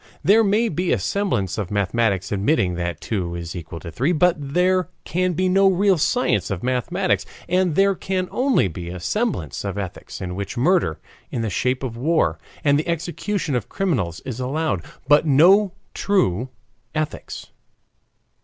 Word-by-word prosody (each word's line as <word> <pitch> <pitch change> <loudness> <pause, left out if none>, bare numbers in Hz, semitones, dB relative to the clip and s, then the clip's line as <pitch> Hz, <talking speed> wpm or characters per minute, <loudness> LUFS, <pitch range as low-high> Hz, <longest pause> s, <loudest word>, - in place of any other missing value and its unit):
There 220 +4 +5
may 215 +3 +2
be 180 -1 -1
a - - +3
semblance 110 - -1
of 100 -4 -3
mathematics 100 -1 0
admitting 100 - +1
that 85 -2 -3
two 90 -5 -3
is 85 0 -6
equal 85 -1 -7
to 85 - -7
three, 135 - +1
but 180 +2 +4
there 180 +6 +1
can 180 +1 0
be 185 +3 +1
no 195 +1 +4
real 190 -1 +3
science 150 - +1
of 95 -3 -3
mathematics. 170 +10 0 0.2
And 180 -2 +1
there 195 +1 +4
can 185 0 -2
only 255 - +2
be 85 0 -6
a 90 +1 -6
semblance 95 - -2
of 100 -1 -4
ethics 95 -3 -6
in 90 -1 -4
which 100 +7 -5
murder 155 - +2 0.3
in 115 - -3
the 110 - -2
shape 125 +7 0
of 120 -3 -4
war 125 - +1 0.2
and 145 -1 +4
the 155 - -3
execution 170 +1 -2
of 120 -5 -2
criminals 125 - -1
is 130 -2 -6
allowed, 135 - -1 0.2
but 150 +2 +5
no 185 +8 +5 0.2
true 130 - +1 0.5
ethics. 155 -1 -4
145 Hz, 165 wpm, -22 LUFS, -, 0.5 s, There